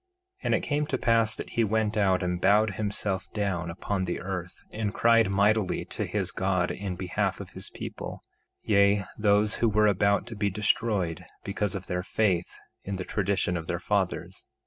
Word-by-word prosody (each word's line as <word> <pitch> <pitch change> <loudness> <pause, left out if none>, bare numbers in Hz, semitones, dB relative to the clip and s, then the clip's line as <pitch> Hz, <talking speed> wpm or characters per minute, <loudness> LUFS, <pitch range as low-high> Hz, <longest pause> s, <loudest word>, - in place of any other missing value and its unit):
1:11 - - -16
And - - +3
it - - 0
came 150 0 0
to 130 - -1
pass 115 -2 +2
that - - -7
he 115 - +2
went 110 0 +1
out 95 -3 +2
and 90 0 -1
bowed 105 +2 +4
himself 100 -2 -2
down 95 -5 -1
upon 95 +3 -2
the 90 - -2
earth, 90 -2 -5
and 105 -2 -1
cried 115 -2 +4
mightily 100 +1 +2
to - - -3
his - - -1
God 95 -2 0
in 95 -2 -4
behalf 90 0 -1
of - - -8
his - - -8
people, - - -7 0.4
yea, 100 -1 +4
those 105 0 +2
who 115 - +3
were 105 0 +3
about 100 0 +3
to 115 - -8
be 100 -1 0
destroyed 100 -3 0 0.2
because 100 0 -2
of 95 -1 -5
their 90 0 -2
faith 95 -2 0 0.3
in 100 - -4
the 90 -1 -4
tradition 95 -3 0
of 80 -1 -4
their 85 - -1
fathers. 95 -2 -2
100 Hz, 190 wpm, -27 LUFS, 95-105 Hz, 0.4 s, bowed